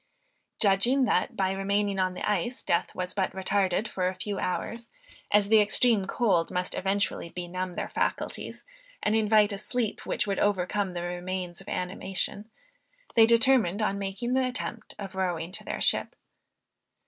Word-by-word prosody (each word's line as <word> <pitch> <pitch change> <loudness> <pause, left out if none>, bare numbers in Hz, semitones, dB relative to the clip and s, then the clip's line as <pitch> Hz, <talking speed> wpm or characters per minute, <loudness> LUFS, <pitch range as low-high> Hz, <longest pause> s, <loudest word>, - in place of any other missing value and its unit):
Judging, 235 +7 +4
that 190 -6 +1
by 190 -1 +1
remaining 200 +1 0
on 185 -1 0
the - - -3
ice, 210 +5 -1
death 170 - +1
was 180 0 -3
but 190 -2 0
retarded 190 +1 0
for 185 -3 -1
a 185 - -2
few 195 +1 -4
hours, 230 +5 -3 0.4
as 205 -1 +4
the 220 +1 +6
extreme 210 0 +3
cold 195 -7 +1
must 180 0 -2
eventually 195 -2 -1
benumb 180 +1 -5
their - - -3
faculties, - - -3 0.4
and 210 - +2
invite 215 -1 +4
a 200 - -4
sleep 230 0 -2
which - - -1
would 200 -1 -1
overcome 200 -1 0
the 175 - -3
remains 180 0 -4
of - - -11
animation, 190 +3 -2 0.6
they 225 -1 +7
determined 230 -5 +4
on 200 -2 0
making 200 +5 -3
the 260 0 +3
attempt 240 -3 -6
of 195 -2 -7
rowing 175 -3 -2
to - - -4
their - - -4
ship. - - +2
195 Hz, 160 wpm, -28 LUFS, 185-215 Hz, 0.6 s, they